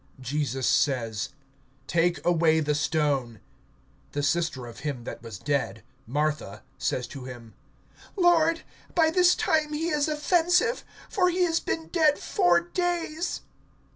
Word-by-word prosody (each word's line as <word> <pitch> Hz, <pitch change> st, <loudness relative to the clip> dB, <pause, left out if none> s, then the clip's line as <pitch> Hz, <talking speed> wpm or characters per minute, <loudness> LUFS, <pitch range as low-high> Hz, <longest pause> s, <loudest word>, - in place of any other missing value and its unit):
(39)Jesus 135 Hz, 0 st, -2 dB
says: 115 Hz, -6 st, +1 dB, 0.6 s
Take 170 Hz, +1 st, +1 dB
away 165 Hz, -2 st, +4 dB
the 150 Hz, -1 st, 0 dB
stone. 145 Hz, -6 st, 0 dB, 0.7 s
The 145 Hz, -, -2 dB
sister 155 Hz, -4 st, 0 dB
of 120 Hz, +2 st, -10 dB
him 140 Hz, -4 st, -4 dB
that 120 Hz, -, -7 dB
was 115 Hz, -4 st, -8 dB
dead, 135 Hz, -2 st, -2 dB, 0.2 s
Martha, 150 Hz, -6 st, -2 dB, 0.2 s
says -, -, -1 dB
to 135 Hz, -3 st, -8 dB
him: 120 Hz, -3 st, -10 dB, 0.6 s
Lord, 335 Hz, -3 st, +4 dB, 0.3 s
by 320 Hz, -2 st, +4 dB
this 360 Hz, +1 st, +5 dB
time 305 Hz, -1 st, +1 dB
he 325 Hz, +3 st, -1 dB
is 300 Hz, -2 st, +1 dB
offensive; 355 Hz, +8 st, +2 dB, 0.2 s
for 365 Hz, -2 st, +2 dB
he 360 Hz, +1 st, +1 dB
has 335 Hz, -1 st, +2 dB
been 325 Hz, 0 st, -3 dB
dead 310 Hz, -4 st, +3 dB
four 175 Hz, -1 st, +2 dB
days. 345 Hz, -, -2 dB
165 Hz, 135 wpm, -26 LUFS, -, 0.7 s, this